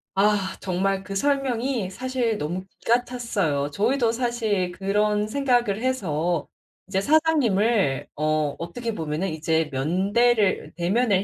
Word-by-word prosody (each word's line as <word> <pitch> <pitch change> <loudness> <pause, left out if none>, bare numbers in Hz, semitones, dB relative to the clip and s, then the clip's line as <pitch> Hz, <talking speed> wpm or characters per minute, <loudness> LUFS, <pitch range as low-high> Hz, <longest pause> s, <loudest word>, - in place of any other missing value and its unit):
아 195 -1 +2
정말 190 +1 -1
그 195 - -6
설명이 260 -3 0
사실 245 +1 -1
너무 180 +3 -4
기가 245 +2 +2
찼어요. 195 - -1
저희도 230 - +1
사실 225 -6 -1
그런 210 +2 +1
생각을 240 -5 +1
해서 175 - -1 0.4
이제 190 0 0
사장님을 230 - +2
어 155 -1 0
어떻게 225 +8 -4
보면은 160 +1 -2
'이제 160 0 0
면대를 195 - +1
대면을 195 +3 +2
200 Hz, 260 characters per minute, -24 LUFS, 175-240 Hz, 0.4 s, 아